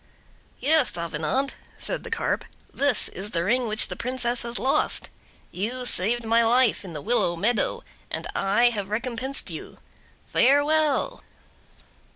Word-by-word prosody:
"Yes, 295 - +3
Avenant," 170 - -1 0.2
said - - -3
the - - -8
Carp, - - -1 0.3
"this 280 -5 +1
is 195 +3 -5
the 170 -4 -1
ring 240 +6 +1
which 215 0 +3
the - - -6
Princess 245 -1 -2
has 235 0 0
lost. 265 - 0 0.4
You 240 +7 -2
saved 235 +3 -1
my 230 +1 +4
life 240 -1 +3
in 180 -4 -8
the 150 - -6
willow 215 -7 +2
meadow, 210 +7 0 0.3
and - - -2
I 210 +5 +3
have 205 -4 -3
recompensed 240 +4 -3
you. - - -8 0.5
Farewell!" 290 +2 +3
235 Hz, 140 wpm, -25 LUFS, 205-255 Hz, 0.5 s, my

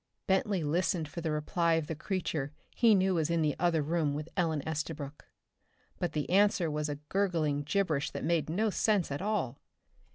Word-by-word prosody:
Bentley 190 -2 +1
listened 170 +1 0
for 170 - -6
the 160 - -1
reply 165 +2 +1
of 160 -2 0
the 160 - -4
creature 155 -4 -2 0.2
he 230 -3 +5
knew 190 0 +3
was 165 -2 +1
in 170 -1 +2
the 150 -1 +1
other 165 -3 +2
room 155 -2 0
with 155 +2 -5
Ellen 160 -6 0
Estabrook. 150 -2 -4 0.7
But 175 - -1
the 150 -2 -1
answer 195 -4 +3
was 150 0 -2
a 145 - -2
gurgling 165 -7 +1
gibberish 155 -2 0
that - - -6
made 160 -3 +1
no 210 +6 +1
sense 200 -6 +1
at 140 - -3
all! 205 - -1
165 Hz, 185 wpm, -31 LUFS, 150-185 Hz, 0.7 s, he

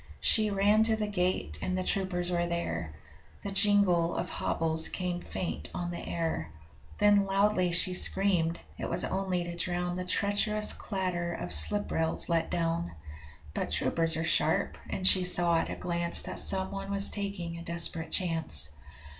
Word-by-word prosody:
She 215 -1 +7
ran 205 +2 +2
to 225 -1 +2
the 215 -1 -3
gate, 180 - -2
and 185 - -3
the 185 - -2
troopers 180 -2 -2
were 175 0 -1
there 85 - -4 0.5
The 200 - -5
jingle 195 -4 +3
of 175 0 -4
hobbles 160 0 +1
came 180 -1 -4
faint 175 - -5
on 175 0 -4
the 175 - -6
air 160 - -4 0.5
Then 205 -1 +3
loudly 195 -2 +1
she 180 +2 +2
screamed: 180 -3 +2 0.2
it - - -4
was 175 +1 0
only 190 -2 -2
to 175 0 -7
drown 175 0 -3
The 180 - -4
treacherous 205 +3 0
clatter 180 -3 -4
of 90 - -4
slip 80 - +3
rails 160 +2 0
let 165 -1 0
down. 170 0 -3 0.6
But - - -3
troopers 165 -1 0
are 160 - -2
sharp, - - +1
and 185 - -4
she 185 -1 +6
saw 175 -2 +4
at - - -4
a - - -5
glance 170 -1 +1
That - - -5
someone 195 +1 +1
was 200 0 +3
taking 180 -5 -5
a - - -9
desperate 170 -1 -1
chance. 160 - 0
180 Hz, 165 wpm, -28 LUFS, 170-195 Hz, 0.6 s, She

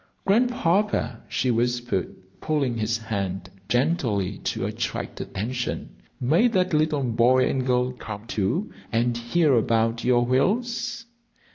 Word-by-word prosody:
"Grandpapa," 205 - +1
she 130 - +1
whispered, 120 -4 -1 0.3
pulling 140 -6 0
his 110 +1 0
hand 100 -4 -4 0.2
gently 120 - 0
to - - -2
attract - - -4
attention, 120 +5 -3 0.3
"may 160 - +4
that 185 -6 +1
little 150 -2 +2
boy 125 +2 +3
and 130 -1 -1
girl 125 0 +2
come, 110 -4 -8
too, 115 - -1 0.2
and 120 +1 +1
hear 135 +6 +2
about 115 0 +2
your 120 -1 +3
whales?" 230 - 0
125 Hz, 120 wpm, -25 LUFS, 115-165 Hz, 0.3 s, may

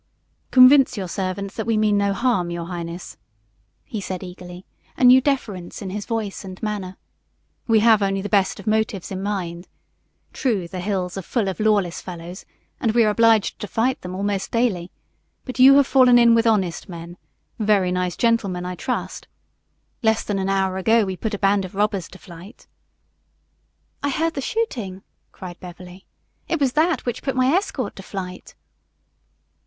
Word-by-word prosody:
"Convince 255 -1 +6
your 190 -2 -3
servant 195 +2 -3
that 220 -1 -5
we 225 -1 +2
mean 215 -1 +2
no 200 0 +2
harm, 195 -5 0
your 170 -1 -4
highness," 170 0 -7 0.7
he 215 - -5
said 185 -1 -5
eagerly, 180 0 -10 0.3
a - - -2
new 250 +1 +8
deference 215 -11 -2
in 190 -2 -6
his 205 +1 -5
voice 220 -4 -3
and 185 -1 -9
manner. 200 -3 -4 0.7
"We 225 -2 +4
have 220 -2 +5
only 195 -1 0
the - - -3
best 200 -2 +1
of 200 - -10
motives 215 -4 -1
in 190 0 -4
mind. 180 -4 -4 0.7
True, 215 - -1
the 185 +2 -7
hills 185 -1 -2
are - - -4
full 215 +3 -1
of 190 - -4
lawless 205 -5 +1
fellows 175 +1 -9 0.3
and 225 -3 0
we 235 0 +4
are 215 - +3
obliged 225 -1 +3
to 210 - -5
fight 245 +6 0
them 180 0 -6
almost 200 0 -2
daily, 210 -7 0 0.6
but 255 -1 -7
you 270 +2 +8
have 280 -1 +6
fallen 255 -2 +5
in 235 -1 +6
with 230 0 +3
honest 195 -5 0
men 170 0 -8 0.4
very 205 -4 +2
nice 180 -1 -1
gentlemen, 200 -7 0
I 180 - -4
trust. 245 +8 -4 0.7
Less 220 -2 +2
than 205 -2 -2
an 190 0 -1
hour 190 -1 0
ago 220 +3 +3
we 190 -1 -4
put 215 +3 -3
a - - -5
band 195 0 +2
of 185 0 -8
robbers 200 -3 0
to - - -14
flight 180 +6 -13 0.7
" - - -45
"I 285 - 0
heard 325 +4 0
the 275 - -4
shooting," 230 - -3 0.3
cried 180 -2 -10
Beverly. 180 +1 -12 0.4
"It 330 - -1
was 270 -3 +1
that 320 +2 +1
which 245 -1 -3
put 270 - -2
my 255 0 +3
escort 300 - -1
to - - -7
flight." 185 -2 -8
200 Hz, 180 wpm, -22 LUFS, 185-230 Hz, 0.7 s, new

